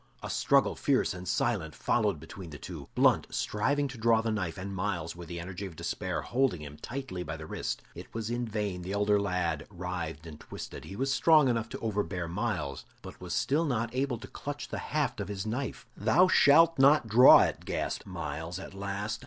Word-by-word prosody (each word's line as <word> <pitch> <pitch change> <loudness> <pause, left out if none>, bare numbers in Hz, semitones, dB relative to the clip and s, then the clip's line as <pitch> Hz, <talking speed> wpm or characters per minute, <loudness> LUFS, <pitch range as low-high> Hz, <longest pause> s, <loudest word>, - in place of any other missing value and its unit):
A - - -4
struggle - - +3
fierce - - +1
and 90 0 -8
silent 95 -10 0
followed 105 -8 +1
between 85 +3 -9
the 75 - -8
two; 80 -5 -8
Blunt - - +4
striving 140 +8 0
to 125 -2 -9
draw 115 0 +4
his 110 -1 0
knife, 90 -6 -2
and 100 +1 -5
Myles, 90 -4 -2
with 85 -1 -9
the 85 0 -5
energy 90 +3 -6
of 85 - -11
despair, - - -3
holding 125 - +1
him 75 0 -9
tightly 120 - -5
by 80 -1 -5
the 80 - -8
wrist. - - -4
It - - -10
was 115 0 -4
in 120 0 -2
vain 105 -4 -3
the 90 +3 -5
elder 105 0 +3
lad 90 -4 -1
writhed 90 -4 -5
and 75 -2 -10
twisted; - - -8
he 95 - -8
was 135 +5 0
strong 155 -4 +5
enough 115 -2 -1
to - - -6
overbear 100 -5 -2
Myles, 85 - -3 0.2
but - - -8 0.2
still 145 +4 +1
was - - -1
not 115 -2 -1
able 130 -1 0
to 115 - -10
clutch 145 0 -6
the - - -4
haft 150 -6 -1
of 100 - -4
his 100 -1 -4
knife. 125 +4 -3
"Thou 185 +4 +4
shalt 165 -1 +6
not 140 -2 +6
draw 120 +4 +9
it!" - - -1
gasped - - -3
Myles 80 +4 -5
at 95 - -9
last. 100 +2 -3
100 Hz, 205 wpm, -30 LUFS, 90-120 Hz, 0.2 s, draw